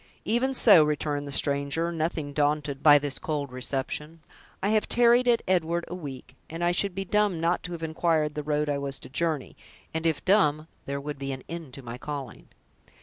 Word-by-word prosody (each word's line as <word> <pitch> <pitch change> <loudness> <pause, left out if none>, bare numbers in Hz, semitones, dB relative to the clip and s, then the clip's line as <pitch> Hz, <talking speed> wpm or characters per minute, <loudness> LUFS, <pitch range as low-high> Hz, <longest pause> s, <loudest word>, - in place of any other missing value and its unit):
"Even 250 +5 +1
so," 200 -10 +7
returned 150 -1 -2
the - - -6
stranger, 140 +4 +1
nothing 160 -3 -3
daunted 145 -1 0
by 145 0 +8
this 145 -2 -2
cold 145 -4 -3
reception; 145 +5 -4 0.4
"I 200 - +2
have 215 0 +1
tarried 240 +1 +4
at 235 -1 +3
'Edward' 170 -2 +1
a - - -7
week, 145 -8 -8
and 165 +2 -5
I 175 - +3
should 180 +1 0
be 195 0 -3
dumb 205 -3 +1
not 170 +2 +1
to 180 - -5
have 165 -1 -7
inquired 160 -1 0
the 150 - -3
road 150 0 -1
I 145 -1 -1
was 140 -1 -2
to 130 - -12
journey; 155 -1 -2 0.4
and 160 +1 -1
if 160 - -1
dumb 155 -6 +3 0.2
there 140 0 -3
would 145 0 -6
be 135 0 -4
an 130 - -8
end 165 -5 -7
to 135 - -10
my 120 +1 -7
calling." 140 -5 -7
155 Hz, 205 wpm, -27 LUFS, 140-175 Hz, 0.4 s, by